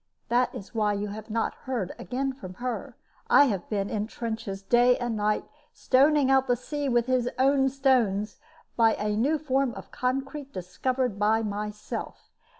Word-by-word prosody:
This 245 +1 +3
is 195 - -9
why 210 -2 +1
you 205 0 -3
have 215 +2 -8
not 225 +1 -1
heard 235 -8 -4
again 270 +2 -2
from 185 -8 -10
her. 245 +3 -5 0.3
I - - +8
have 200 -9 -2
been 200 -2 -1
in 210 -1 -2
the - - -14
trenches 220 -4 -4
day 245 +4 +4
and 240 -2 -2
night, 210 0 0 0.3
stoning 275 +1 +3
out 265 0 +4
the 245 - +3
sea 285 +3 -3
with 240 -2 +2
his 255 -1 +1
own 270 +1 +3
stones, 245 -7 +1 0.4
by 225 -1 +4
a 210 0 -1
new 275 +9 +2
form 270 -4 0
of - - -10
concrete 270 +2 -3
discovered 235 +5 -2
by 220 +2 +3
myself. 210 0 -5
240 Hz, 170 wpm, -27 LUFS, 210-265 Hz, 0.4 s, I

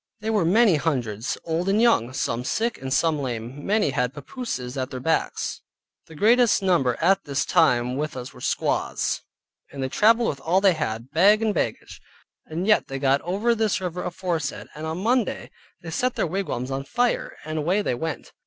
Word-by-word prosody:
They 220 +1 -2
were 210 -6 +2
many 200 0 +5
hundreds, 125 -7 -2
old 170 +3 -1
and 200 +2 +3
young, 225 - +3
some 125 -2 -2
sick, 230 - -1
and 135 0 -5
some 155 +2 +2
lame; 125 +1 -5
many 205 -7 +1
had 125 +1 -1
papooses 140 - -5
at 130 -1 -3
their 130 - -6
backs. 160 +6 -1 0.5
The 160 - -13
greatest 230 +4 +4
number 165 -10 +2
at 190 +4 +3
this 140 0 -1
time 125 +1 +2
with 150 -2 -3
us 125 0 -7
were - - -14
squaws, - - -1 0.5
and 135 -1 -5
they 130 - -2
traveled 225 - +4
with 140 - -5
all 175 +4 +2
they 195 -2 +4
had, 115 -3 -4
bag 200 +8 +5
and 215 -2 +1
baggage, - - -3 0.5
and 165 +4 -3
yet 215 0 +3
they 135 - -4
got 135 0 +2
over 205 +7 +1
this 220 -3 0
river 180 -1 -4
aforesaid; 175 -4 -3
and 155 +1 -6
on 165 +4 -4
Monday 240 -2 0 0.3
they 165 - -6
set 250 +8 0
their - - 0
wigwams 155 -8 -3
on 135 +1 -2
fire, 240 - -1
and 155 0 -3
away 180 +7 +1
they - - 0
went. 160 +6 -5
160 Hz, 190 wpm, -24 LUFS, 135-205 Hz, 0.5 s, many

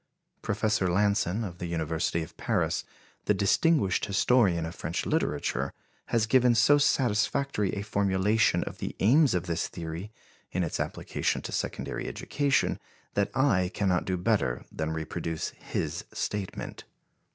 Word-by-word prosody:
Professor 105 -2 +1
Lanson, 100 +2 +1
of 90 -4 -6
the 90 - -3
University 80 0 -1
of 80 - -12
Paris, - - 0 0.4
the 105 - +3
distinguished 100 - +2
historian 100 -4 +3
of 80 - -5
French - - -3
literature, 70 -2 0 0.4
has 115 -2 +2
given 125 +1 +4
so 145 +6 +5
satisfactory 125 -4 +1
a 100 - -3
formulation 100 +1 +2
of - - -8
the - - -4
aims 135 - +5
of 90 0 -1
this 85 -2 -1
theory 85 +4 -6 0.4
in 90 - 0
its 80 - -3
application - - -1
to - - -5
secondary - - -3
education 140 -2 0 0.3
that 100 0 +1
I 100 -10 +3
cannot 95 -3 +1
do 95 -1 -1
better 90 - 0
than 80 0 -3
reproduce 80 0 -3
his - - -4
statement. 100 -2 -4
100 Hz, 140 wpm, -28 LUFS, 85-110 Hz, 0.4 s, so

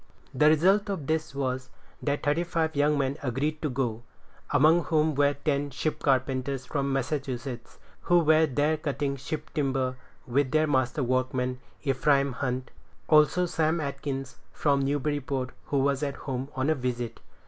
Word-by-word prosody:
The 150 +4 +5
result 190 +7 +4
of 190 -8 -3
this 160 -1 -1
was, 130 -2 -2 0.3
that 145 0 -1
thirty 150 +4 +2
five 165 -2 -1
young 145 +1 +3
men 140 +1 -1
agreed 145 +4 -2
to 155 - -1
go, 120 -4 -2 0.5
among 160 +5 +4
whom 155 -1 +2
were 145 0 +2
ten 145 -1 -1
ship 150 +3 -3
carpenters 130 -1 0
from 140 +1 -1
Massachusetts, 135 -2 -3 0.2
who 175 - +3
were 160 -1 +5
there 150 +3 +1
cutting 145 -2 -2
ship 140 +3 -6
timber, 135 -4 0 0.3
with 130 +2 +1
their 155 +3 +3
master 130 -1 +1
workman, 130 0 0 0.2
Ephraim 140 0 +2
Hunt; 130 0 -3 0.4
also, 155 +3 +5
Sam 165 -1 +1
Atkins, 140 -2 -4
from 140 -2 +1
Newburyport, 140 -2 -1
who 140 - -1
was 140 0 +1
at 140 -2 -2
home 135 -1 -4
on 135 +4 +1
a - - +5
visit. 125 -4 -3
140 Hz, 155 wpm, -27 LUFS, 130-155 Hz, 0.5 s, The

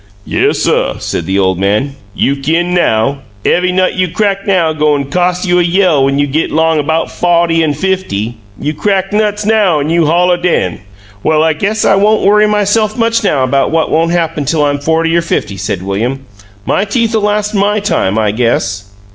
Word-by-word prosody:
"Yes, - - 0
suh," - - 0
said 80 - -4
the 95 - 0
old 95 -2 +1
man. 105 +8 0 0.2
"You 140 - +1
kin 165 +6 -1
now. 140 -5 +1 0.3
Ev'y 180 +1 +2
nut 185 0 +1
you 185 0 0
crac' 200 +2 -1
now 175 -5 +2
goin' 145 -2 0
cos' 180 +2 0
you 180 -1 +2
a - - +4
yell 175 -4 +2
when 140 0 0
you 145 - +2
git 145 +3 -1
'long 160 -1 +1
'bout 160 +1 -1
fawty 170 -1 +1
an' 150 -2 0
fifty. 135 - -2 0.2
You 150 +2 -2
crack 195 +3 -1
nuts 210 -1 0
now 210 -7 +2
an' 145 +2 -2
you'll 165 -2 +2
holler 175 +2 +2
den!" 175 - -1 0.4
"Well, 155 +4 +2
I 160 0 +2
guess 205 +7 -1
I - - +4
won't 210 +2 +2
worry 210 +1 +4
myself 210 +1 0
much 230 -1 +1
now 145 -9 +1
about 135 +2 +1
what 160 0 0
won't 165 +1 +2
happen 165 -3 -1
till 150 +2 0
I'm 145 0 -1
forty 160 +2 0
or 170 - +3
fifty," 135 -11 -2
said 95 -1 -4
William. 115 +8 -2 0.4
"My - - +1
teeth 225 +2 -1
'll 220 - +1
last 210 0 -1
MY 205 +1 +1
time, 110 - -1
I 110 -2 +1
guess." 100 -4 -1
165 Hz, 195 wpm, -12 LUFS, 140-195 Hz, 0.4 s, a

